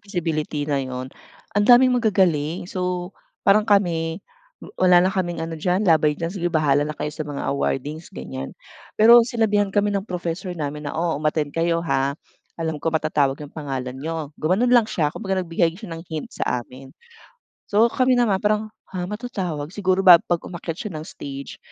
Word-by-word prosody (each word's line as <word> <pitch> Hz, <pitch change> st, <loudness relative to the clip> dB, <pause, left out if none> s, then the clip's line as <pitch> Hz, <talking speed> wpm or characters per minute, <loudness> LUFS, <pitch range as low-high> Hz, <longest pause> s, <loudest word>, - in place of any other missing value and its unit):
feasibility 160 Hz, -6 st, -3 dB
na 145 Hz, -2 st, 0 dB
'yon, 130 Hz, 0 st, -6 dB, 0.4 s
andaming 245 Hz, +5 st, +6 dB
magagaling. 180 Hz, -9 st, +1 dB
So, 180 Hz, 0 st, -3 dB, 0.3 s
parang 210 Hz, +2 st, +4 dB
kami, 170 Hz, -3 st, +1 dB, 0.4 s
wa -, -, -10 dB, 0.2 s
wala 175 Hz, 0 st, +6 dB
na 185 Hz, -, +2 dB
kaming 175 Hz, -3 st, -2 dB
ano 165 Hz, -, -6 dB
diyan, 180 Hz, +6 st, 0 dB
laban 155 Hz, -4 st, +3 dB
diyan, 165 Hz, +2 st, -3 dB
sige 175 Hz, -3 st, -1 dB
bahala 150 Hz, -4 st, +2 dB
na 150 Hz, -, -6 dB
kayo 150 Hz, -, -4 dB
sa 155 Hz, 0 st, -5 dB
mga 145 Hz, -, -4 dB
awardings, 145 Hz, +3 st, -2 dB
ganyan. 65 Hz, 0 st, -7 dB, 0.4 s
Pero, 235 Hz, +2 st, +8 dB
sinabihan 220 Hz, -3 st, +1 dB
kami 205 Hz, +1 st, +1 dB
ng 200 Hz, +1 st, -2 dB
professor 180 Hz, +1 st, -4 dB
namin 150 Hz, -1 st, -4 dB
na, -, -, -6 dB
"O, 165 Hz, -2 st, 0 dB
umattend 150 Hz, -1 st, 0 dB
kayo, 165 Hz, 0 st, 0 dB
ha. 140 Hz, -3 st, 0 dB, 0.4 s
Alam 160 Hz, -2 st, -3 dB
ko 165 Hz, -, -1 dB
matatawag 155 Hz, -4 st, +1 dB
'yong 145 Hz, -1 st, -10 dB
pangalan 135 Hz, -5 st, -4 dB
n'yo." 160 Hz, -1 st, -4 dB
Gumanon 195 Hz, +10 st, +2 dB
lang 240 Hz, -3 st, +5 dB
siya 150 Hz, -3 st, 0 dB
kumbaga 190 Hz, -3 st, -2 dB
nagbigay 165 Hz, 0 st, 0 dB
siya 195 Hz, -4 st, -9 dB
ng 165 Hz, -, -7 dB
hint 155 Hz, -2 st, -5 dB
sa 125 Hz, -1 st, -2 dB
amin. 130 Hz, +2 st, -13 dB, 0.8 s
So, 220 Hz, +3 st, +4 dB
kami 255 Hz, 0 st, +3 dB
naman 225 Hz, -6 st, +2 dB
parang, 215 Hz, +1 st, 0 dB, 0.2 s
"Ha? 180 Hz, -1 st, -2 dB
Matatawag?" 195 Hz, -10 st, -4 dB
Siguro 190 Hz, -2 st, +1 dB
ba 185 Hz, -3 st, +9 dB
'pag 175 Hz, -, 0 dB
umakyat 170 Hz, -2 st, -6 dB
siya 210 Hz, -, -5 dB
ng 155 Hz, -, -5 dB
stage 140 Hz, -3 st, -8 dB
170 Hz, 175 wpm, -22 LUFS, 150-200 Hz, 0.8 s, ba